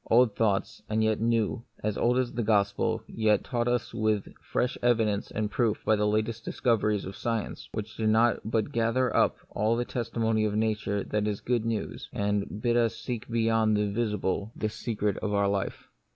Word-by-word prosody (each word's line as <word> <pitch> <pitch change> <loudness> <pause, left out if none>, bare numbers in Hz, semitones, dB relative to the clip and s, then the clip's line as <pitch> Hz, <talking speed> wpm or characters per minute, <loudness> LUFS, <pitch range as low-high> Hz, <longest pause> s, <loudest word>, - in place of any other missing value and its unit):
Old 115 -2 +5
thoughts, 105 -4 0
and 110 0 +1
yet 110 -1 +2
new, 115 0 +1 0.2
as 105 -1 0
old 125 +1 +2
as 130 -2 0
the 120 - -1
gospel, 105 +1 +1
yet 110 -2 +2
taught 120 -2 -1
us 120 -1 0
with 110 -2 0
fresh 125 - -1
evidence 110 -4 +2
and 105 -1 -2
proof 115 -1 0
by 110 - +4
the 105 0 +1
last 105 +1 +2 0.2
discov 115 -2 +1
eries 105 -2 0
of 95 - -7
science, 115 -3 -3
which 110 -1 -6
do 110 +2 +3
but 110 -1 -1
gather 115 +2 +1
up - - +3 0.2
the 115 +3 +1
testimony 115 -2 0
of 105 -1 0
Nature 105 -2 0
to - - -13
that 105 -1 0
good 120 -2 +1
news, 115 -2 -3
and 100 +1 -2
bid 120 -1 +2
us 115 -1 +2
seek 120 -3 -5
beyond 115 -2 +2
the 105 -1 0
visible 105 -2 -1
the 110 - -1
secret 105 -2 -2
of 105 -1 -2
our 100 0 +3
life. 100 -1 -2
110 Hz, 185 wpm, -28 LUFS, 105-115 Hz, 0.2 s, Old